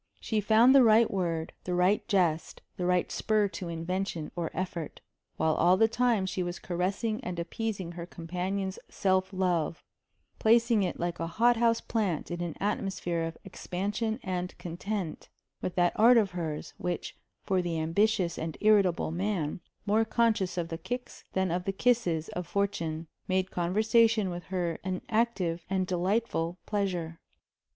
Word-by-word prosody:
She 220 -2 -1
found 225 +5 +6
the 275 - +8
right 225 0 +5
word, 170 -4 -2
the 180 - -2
right 180 +4 +2
jest, 170 -5 0
the 180 - -2
right 180 -1 +1
spur 215 -1 +2
to 180 0 -6
invention 170 0 -3
or 170 -2 -2
effort; 175 -4 -4 0.4
while 160 0 +2
all 175 +4 +4
the 225 - +5
time 230 -3 +2
she 190 0 -2
was 175 0 -3
caressing 200 +7 -2
and 180 -6 -4
appeasing 190 +1 -3
her 170 0 -7
companion's 185 +3 -3
self 190 0 +1
love 175 -4 0 0.6
placing 230 0 +4
it 180 -3 -2
like 175 0 -2
a 165 - -2
hot 235 +8 +3
house 230 0 +3
plant 195 -8 -1
in 175 0 -3
an 170 -3 -3
atmosphere 195 -4 -1
of 165 0 -3
expansion 205 +5 -3
and 180 -1 -3
content 180 0 -4 0.3
with 180 - -3
that 175 -1 +3
art 235 +3 +7
of 210 -4 +3
hers, 160 -4 -4
which, 180 -1 -3 0.3
for 190 -1 +1
the 170 -2 -2
ambitious 170 +2 +1
and 160 -1 -4
irritable 200 -7 +3
man, 180 -3 -1 0.3
more 215 +2 +3
conscious 225 -5 +1
of 170 -1 -2
the 165 0 -5
kicks 245 +4 -6
than 190 -2 +1
of 180 +1 -1
the 195 - 0
kisses 195 -7 +1
of 180 -1 -5
fortune, 170 -6 -1 0.2
made 185 0 0
conversation 215 +3 +3
with 175 0 -6
her 175 -3 -2
an 185 -1 -3
active 215 -7 0
and 190 -1 +1
delightful 180 -1 0
pleasure. 180 -6 -2
185 Hz, 160 wpm, -29 LUFS, 170-215 Hz, 0.6 s, the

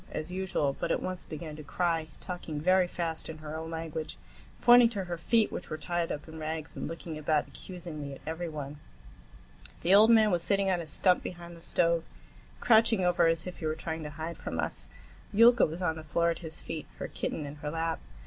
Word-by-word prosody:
as 155 +3 -5
usual, 180 -7 0
but - - -1
at - - +2
once 185 -1 -4
began 155 0 -7
to 155 - -8
cry, 165 0 0
talking 175 -5 -5
very 185 +3 +4
fast 165 -2 -4
in 160 - -6
her 155 0 -7
own 160 0 -5
language, 160 -1 -5 0.4
pointing 240 -1 +8
to 205 -4 -3
her 175 -1 -4
feet 215 +6 +2
which - - -6
were 155 - -3
tied 170 +1 -1
up 150 - -5
in 160 0 -9
rags, 155 0 -4
and - - -4
looking 165 -1 -6
about 155 0 +1
accusingly 165 -6 -7
at 135 - -9
every 165 +2 -3
one. 145 -1 -6 1.0
The 180 - +4
old 215 +3 +8
man 220 -2 +6
was 175 -2 +2
sitting 195 0 +2
on 180 -2 +1
a 165 - -8
stump 180 +4 +3
behind 175 -1 -7
the 165 - -14
stove, 170 0 +2 0.6
crouching 225 -4 +4
over 175 -1 +4
as 165 0 +1
if 180 - -6
he 160 - -2
were 155 - 0
trying 160 0 -4
to 150 - -5
hide 160 +3 -6
from - - -4
us. - - -2 0.4
Yulka 235 +3 +6
was 165 +4 -5
on 160 -2 0
the 160 - -7
floor 170 +2 +1
at 165 - -4
his 160 -2 -5
feet, 160 -2 -6
her - - -4
kitten 155 - -3
in 145 +1 -8
her 150 0 -4
lap. 165 +1 -1
165 Hz, 220 wpm, -30 LUFS, 155-180 Hz, 1.0 s, pointing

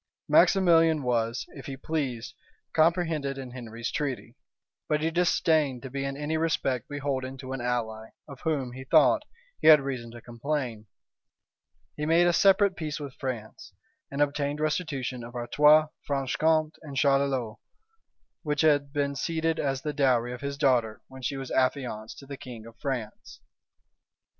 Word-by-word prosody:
Maximilian 165 -5 +5
was, 120 0 0
if 135 - -11
he 135 -1 -6
pleased, 135 -6 -3 0.4
comprehended 160 -4 +1
in 130 -2 -7
Henry's 115 -1 -6
treaty; 130 -4 -3 0.5
but 150 -1 +2
he 160 +1 0
disdained 160 -6 +2
to 130 - -7
be 140 0 -3
in 135 0 -4
any 150 +2 -2
respect 145 -7 -1
beholden 135 -2 -3
to 130 0 -7
an 135 - -4
ally, 110 -2 -2 0.2
of 140 -3 -10
whom, 145 -6 -1
he 130 +2 -8
thought, 160 - +4 0.4
he - - +1
had 155 -1 +10
reason 130 -4 -4
to 120 +1 -10
complain: 120 -2 -4 1.1
he 150 0 -3
made 165 +2 +5
a 175 - +3
separate 195 +1 +4
peace 155 -3 -4
with 140 -3 -7
France, 120 -5 -6 0.4
and 145 +1 +1
obtained 145 0 -2
restitution 145 -6 -2
of 120 +1 -10
Artois, 150 +5 +4 0.2
Franche 135 -2 -1
Compte, 155 0 +1
and 145 -3 -8
Charolois, 135 -5 +1 0.8
which 150 -3 -1
had 145 -3 +3
been 140 -1 -1
ceded 165 +3 -1
as 135 -2 -1
the 150 -1 -2
dowry 125 -4 +2
of 125 - -8
his 140 0 -4
daughter 125 -6 +1
when 130 0 -11
she 135 +2 -2
was 135 -1 -6
affianced 125 -4 -1
to 140 - -11
the 140 0 -8
king 120 -4 -10
of 115 0 -13
France. 125 -6 -5
140 Hz, 160 wpm, -27 LUFS, 125-155 Hz, 1.1 s, had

